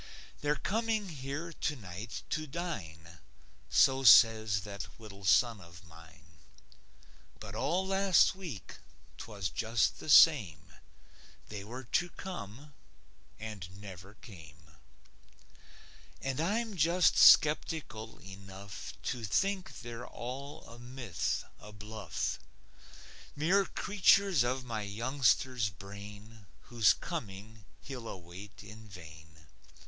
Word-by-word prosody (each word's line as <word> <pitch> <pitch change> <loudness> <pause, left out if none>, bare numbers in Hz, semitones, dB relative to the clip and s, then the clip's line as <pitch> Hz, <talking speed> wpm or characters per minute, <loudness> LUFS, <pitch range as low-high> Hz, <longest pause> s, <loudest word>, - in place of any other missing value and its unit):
They're 145 0 +1
coming 220 +2 -1
here 145 +3 -6
tonight 110 - -5
to 155 -1 -2
dine, 85 - -6 0.5
So 135 -1 +4
says 110 -2 +7
that 100 0 -7
little 100 -3 -12
son 115 +2 +3
of 85 0 -14
mine. 80 0 -17 1.0
But 100 -2 -9
all 170 - 0
last 195 -1 +4
week, 170 - -8 0.4
'twas 100 -5 -4
just 115 +5 0
the - - -8
same; 85 - +5 0.8
They 105 -2 -6
were 125 +5 -8
to 175 +8 0
come, 145 - -8 0.6
and 100 -4 -8
never 100 0 -11
came. 80 -8 -15 1.5
And 135 +2 -2
I'm 215 +5 -1
just 170 +2 +3
skeptical 150 -7 +4
enough 95 0 -9
To 120 -2 -3
think 190 - -1
they're 120 +1 -7
all 140 +5 -7
a 115 +1 -13
myth, 120 - -3
a 105 - -12
bluff; 105 0 -4 1.0
Mere 185 +7 +2
creatures 200 -5 +3
of 130 +1 -2
my 115 -3 -3
youngster's 120 +2 +1
brain, 100 +3 -12 0.2
Whose 115 -4 +5
coming 105 +1 -7 0.2
he'll 125 -4 -8
await 95 +3 -10
in 110 +2 -12
vain. 80 -3 -13
110 Hz, 105 wpm, -32 LUFS, 100-145 Hz, 1.5 s, says